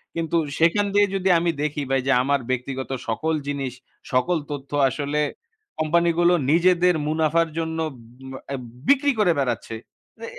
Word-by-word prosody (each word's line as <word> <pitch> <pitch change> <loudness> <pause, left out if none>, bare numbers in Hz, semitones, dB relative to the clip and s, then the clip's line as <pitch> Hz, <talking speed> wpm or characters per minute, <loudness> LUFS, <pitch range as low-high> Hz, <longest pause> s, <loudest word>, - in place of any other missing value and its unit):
কিন্তু 165 0 -1 0.2
সেখান 170 +5 +3
দিয়ে 205 0 +5
যদি 190 0 0
আমি 170 0 0
দেখি 150 0 -2
ভাই, 135 0 +2
যে, - - +3
আমার 140 +1 +1
ব্যক্তিগত 130 +1 -3 0.2
সকল 160 +8 -1
জিনিস, 140 -3 -3 0.4
সকল 170 +8 +2
তথ্য 140 -1 -7 0.2
আসলে 145 +3 -2 0.6
কোম্পানিগুলো 170 +2 +3 0.2
নিজেদের 180 +1 +4
মুনাফার 160 +2 +2
জন্য 160 0 -2 0.2
উম 125 +2 -14 0.2
অ্যা 140 - -3 0.3
বিক্রি 285 +1 +4
করে 195 -5 +4
বেড়াচ্ছে। 120 -4 -2 0.4
তা 230 - -7
155 Hz, 145 wpm, -23 LUFS, 135-170 Hz, 0.6 s, দিয়ে